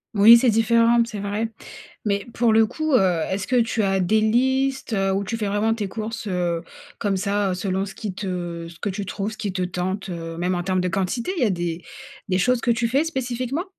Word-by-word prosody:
Oui, 225 +4 +9
c'est 250 - +3
différent, 230 +1 +4
c'est 215 -3 -6
vrai. 205 +3 -2 0.6
Mais 200 0 -1
pour 235 -1 +3
le 220 0 +5
coup, 310 +6 -3
heu, 185 -8 +3
est-ce 190 0 -2
que 255 - +1
tu 230 -2 +1
as 195 -1 +1
des 215 +4 +2
listes, 265 +3 +1
heu, 195 -2 +1
ou 195 +1 0
tu 230 +3 -3
fais 210 - -1
vraiment 205 +3 +1
tes 210 -3 -3
courses, 220 +2 -5
heu, 175 -3 -1 0.4
comme 200 -3 0
ça, 200 +1 0
heu, - - -1
selon 190 +1 -2
ce 195 - -9
qui 210 -4 -5
te 175 -3 -4
ce 165 - -14
que 205 - -1
tu 195 +1 -4
trouves, 205 +3 -3
ce 220 - -11
qui 205 - -2
te 185 -1 -2
tente, 185 +2 -3
heu? 165 -1 -6
Même 180 +2 0
en 175 - -1
termes 185 0 0
de 180 - 0
quantité, 195 - -1
il - - 0
y - - +5
a - - +2
des 175 -2 -3 0.5
des 185 - +1
choses 250 +6 +2
que 240 - 0
tu 235 0 +2
fais 270 +7 +2
spécifiquement? 260 +1 -2
205 Hz, 240 wpm, -23 LUFS, 185-230 Hz, 0.6 s, Oui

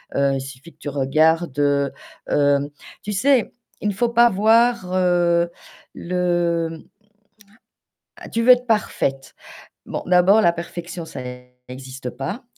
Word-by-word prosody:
Heu, 140 -1 +1
suffit 135 +5 -10
que - - -39
tu 145 - -5
regardes, 155 +2 +1
heu, 140 -1 +1 0.4
hem 145 0 +2 0.3
tu 210 - -5
sais, 250 +4 +2 0.3
il 210 - 0
ne - - -2
faut 235 +4 0
pas 235 0 +5
voir, 225 -1 +2
heu, 175 -2 +2 0.5
le, 175 -2 -1
mmh 160 -1 -10 1.5
Tu 230 - 0
veux 250 - +7
être 250 0 +4
parfaite. 135 -11 -1 0.5
Bon, - - -5
d'abord 180 +4 +5
la 170 -4 +4
perfection 170 0 -7
ça 160 - -8 0.5
n'existe 130 0 -8
pas, 195 - -6
170 Hz, 135 wpm, -21 LUFS, 140-205 Hz, 1.5 s, veux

